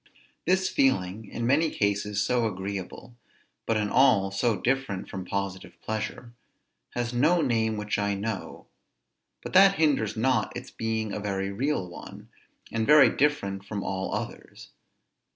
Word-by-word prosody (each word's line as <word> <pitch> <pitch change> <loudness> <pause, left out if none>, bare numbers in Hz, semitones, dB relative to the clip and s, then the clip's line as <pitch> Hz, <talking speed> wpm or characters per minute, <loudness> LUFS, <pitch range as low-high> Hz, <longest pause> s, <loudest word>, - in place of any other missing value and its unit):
This 185 +1 +3
feeling, 105 - +1
in 120 - -4
many 150 +6 +3
cases 100 -2 0
so 120 -1 +1
agreeable, 100 +4 -6 0.5
but 115 - +2
in 105 -1 -1
all 110 -8 +4
so 110 +3 +1
different 125 -7 -1
from 95 -2 -6
positive 100 -1 -4
pleasure, 110 +2 -5 0.6
has 120 0 -2
no 155 +8 +3
name 110 -4 +1
which 105 0 -2
I 100 0 0
know; 100 0 -5 0.8
but - - -7
that 195 +1 +7
hinders 145 - +1
not 120 0 +1
its 120 - -9
being 110 -2 -2
a - - -3
very 100 -1 -2
real 130 -2 -1
one, 85 - -11 0.4
and 115 -1 -1
very 150 -1 +7
different 100 -10 0
from 100 -1 -5
all 95 0 -3
others. - - -7
110 Hz, 145 wpm, -27 LUFS, 100-130 Hz, 0.8 s, that